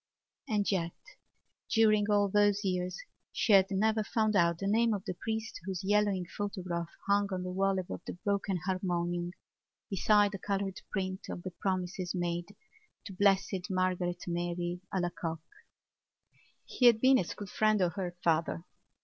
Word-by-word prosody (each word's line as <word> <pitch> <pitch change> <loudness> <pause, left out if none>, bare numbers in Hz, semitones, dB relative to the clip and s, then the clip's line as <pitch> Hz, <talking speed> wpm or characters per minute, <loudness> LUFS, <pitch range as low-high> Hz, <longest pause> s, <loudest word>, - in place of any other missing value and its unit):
And 210 -2 +1
yet 170 -3 -1 0.8
during 215 -2 +4
all 205 -1 +4
those 205 +1 +2
years 180 -1 -1 0.3
she 215 - +2
had 195 -1 +6
never 215 +2 +1
found 215 0 0
out 170 -2 +3
the 195 - -4
name 225 +2 +3
of 195 - -6
the - - -2
priest 220 +3 -4
whose 190 -1 -4
yellowing 205 -2 +2
photograph 180 -3 -4 0.2
hung 200 0 +2
on 185 -1 -2
the 180 - -4
wall 195 +1 +1
above 185 -1 -4
the - - -3
broken 200 0 -1
harmonium 175 -2 -1 0.6
beside 205 +1 +4
the 195 - -6
coloured 195 -1 -2
print 190 -1 -3
of 175 - -6
the 185 - -5
promises 185 0 -2
made 175 -1 -2 0.6
to 200 - -7
Blessed 195 -1 +2
Margaret 185 -1 0
Mary 175 0 -2
Alacoque. 175 -3 -2 1.3
He 250 - +3
had 230 -2 +6
been 260 +2 +5
a - - +1
school 205 +4 -7
friend 215 +2 +2
of 180 -2 +1
her 180 -3 -4
father. 165 +1 +1
190 Hz, 155 wpm, -31 LUFS, 175-205 Hz, 1.3 s, had